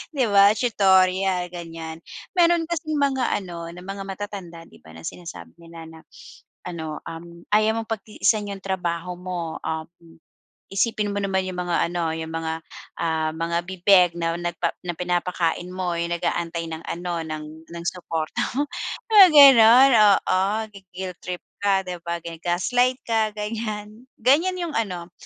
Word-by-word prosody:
di 260 -3 +2
ba 200 0 +6
tutorial 190 -5 +2
ganyan, 165 -2 -7 0.4
meron 340 -1 +4
kasing 310 -2 -2
mga 265 -3 +1
ano 170 -2 -7
na 180 - -10
mga 195 +1 -6
matatanda 195 -4 -7
di 85 - -17
ba 80 +1 -16
na 80 - -11
sinasabi 90 - -8
nila 165 -1 -11
na 160 0 -13 0.7
ano 160 -3 -5
um, 170 +1 -9
ayaw 215 +1 +3
mong 225 - -8
pagtiisan 215 0 0
yung 195 -1 -6
trabaho 180 -2 -2
mo 175 -2 -5
um, 160 0 -3 0.9
isipin 210 0 0
mo 200 - -2
naman 190 -1 0
yung 185 -1 -5
mga 175 -1 0
ano, 170 -2 -1
yung 160 0 -5
mga, 160 0 -3 0.4
ah, 160 -1 0
mga 165 +1 -1
bibeg 185 -1 +5
na, 165 0 -1
nagpa 175 -1 -2
na 175 -1 -3
pinapakain 175 -1 -1
mo 180 -2 -2
yung 170 0 -2
nag-aantay 170 0 -2
ng 160 0 -6
ano 175 0 -3
ng 155 -1 -5 0.2
ng 170 0 -8
supporta 165 -3 -3
mo 285 +3 +1 0.5
mga 405 -3 +10
ganon 265 -2 +9 0.3
oo 185 - 0 0.3
gui-guilt 185 -2 -8
trip 180 -1 -6 0.2
ka 200 -1 +2
di 180 -1 -6
ba 170 0 -2
gaslight 180 +10 0
ka 220 -2 +1
ganyan, 215 +1 -5
ganyan 310 +10 +3
yung 335 -3 -4
ano, 180 -6 -4
180 Hz, 150 wpm, -23 LUFS, 170-210 Hz, 0.9 s, mga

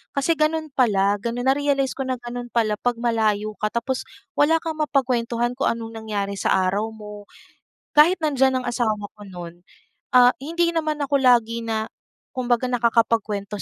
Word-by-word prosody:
Kasi 310 +4 +1
ganun 310 0 0
pala, 205 -6 +2
ganun 235 +3 -3
na-realize 275 0 +1
ko 270 -1 -4
na 260 - 0
ganun 245 0 -7
pala 220 -3 0
'pag 245 -1 0
malayo 220 -3 0
ka, 215 - 0
tapos 235 +4 -3 0.2
wala 320 0 +2
kang 320 -2 -4
mapagkuwentuhan 240 -5 0
kung 255 +2 -1
anong 225 -1 -2
nangyari 200 -2 -3
sa - - +2 0.2
araw 210 +3 -1
mo. 210 -1 -10 0.7
Kahit 335 +4 +6
nandiyan 265 -4 +2
ang - - -9
asawa 215 -4 -1
ko 205 - -11
nun, 175 -2 -10 0.5
ah, 245 0 +7
hindi 335 +3 0
naman 310 -2 -1
ako 280 -1 0
lagi 235 -2 +3
na 220 -1 -2 0.5
kumbaga 245 -1 0
nakakapagkwento 225 -4 0
240 Hz, 160 wpm, -23 LUFS, 215-275 Hz, 0.7 s, ah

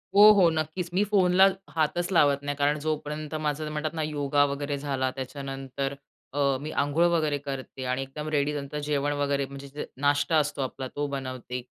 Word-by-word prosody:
हो, 205 - +8
हो, 185 -4 +5
नक्कीच, 160 +2 -2
मी 190 +3 +3
फोनला 190 -2 +5 0.3
हातच 170 +3 0
लावत 145 -4 +4
नाही 145 0 -3
कारण 145 +1 +2
जोपर्यंत 150 0 -3
माझं 155 0 -2
म्हणतात 155 +1 -2
ना 160 - -2
योगा 145 -1 +1
वगैरे 140 0 -2
झाला 135 -2 -1
त्याच्यानंतर. 135 0 -4 0.4
अ, 145 - -2 0.2
मी 155 - -5
अंघोळ 145 +4 +2
वगैरे 155 -3 +1
करते 135 -1 -6
आणि 130 +1 -1
एकदम 145 +3 -6
रेडी. 150 -1 +1
नंतर 145 0 -4
जेवण 145 -1 +1
वगैरे 140 -1 +1
म्हणजे 140 +1 -7
नाश्ता 145 +3 +2
असतो 150 -2 0
आपला 130 0 -4
तो 145 - -1
बनवते 130 -2 -5
145 Hz, 175 wpm, -27 LUFS, 140-155 Hz, 0.4 s, हो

